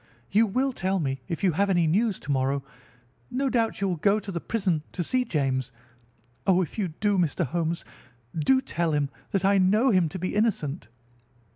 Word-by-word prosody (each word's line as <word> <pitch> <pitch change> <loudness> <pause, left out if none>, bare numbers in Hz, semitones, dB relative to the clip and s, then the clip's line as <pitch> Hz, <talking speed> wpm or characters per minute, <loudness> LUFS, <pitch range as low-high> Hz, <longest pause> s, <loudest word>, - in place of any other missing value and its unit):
"You 220 +3 +4
will 260 +6 0
tell 190 -2 -1
me 135 -6 -2
if 165 - -4
you 185 - +4
have 200 +5 +1
any 175 -3 +3
news 200 +6 +1
to 145 - -4
morrow. 135 +1 0 0.7
No 270 +1 -1
doubt 230 -3 +1
you 200 - +2
will 180 -2 -1
go 200 +6 +3
to 200 -2 -5
the 170 -2 -3
prison 190 -8 0
to 180 - -2
see 255 +7 +1
James. 135 - -1 0.8
Oh, 185 -1 +4
if 175 - -7
you 195 - +1
do, 195 +4 0
Mr. 170 0 +1
Holmes, 165 +4 -2 0.5
do 260 - +3
tell 170 -8 -1
him 145 -1 +1 0.2
that 195 -2 0
I 200 0 +4
know 210 +8 +4
him 180 -5 +3
to 170 - -6
be 185 +1 -3
innocent." 185 - 0
185 Hz, 195 wpm, -26 LUFS, 155-210 Hz, 0.8 s, You